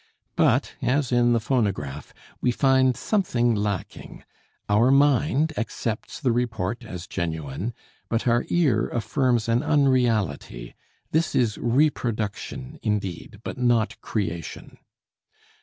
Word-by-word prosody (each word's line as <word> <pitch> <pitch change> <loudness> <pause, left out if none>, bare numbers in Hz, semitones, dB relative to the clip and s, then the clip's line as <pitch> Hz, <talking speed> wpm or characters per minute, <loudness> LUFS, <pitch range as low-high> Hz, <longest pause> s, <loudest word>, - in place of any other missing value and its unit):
But, - - +2
as 130 +1 +1
in 120 -1 +4
the 115 - +3
phonograph, 100 - -2 0.3
we - - +2
find 130 0 +3
something 125 - +1
lacking; 105 -3 -4 0.4
our 105 +5 +4
mind 145 +2 +3
accepts 115 -1 -4
the 130 -5 +1
report 115 -2 -2
as 90 -5 -7
genuine, 80 - -4 0.3
but 115 +1 -1
our 120 0 +3
ear 140 -11 +2
affirms 120 -1 0
an 115 +1 +2
unreality; 115 - +1 0.4
this 160 +1 +1
is 115 -5 +1
reproduction, 125 +1 -1
indeed, 105 -1 -3
but - - -6
not 120 -3 +1
creation. 85 -7 -4
120 Hz, 110 wpm, -25 LUFS, 105-130 Hz, 0.4 s, in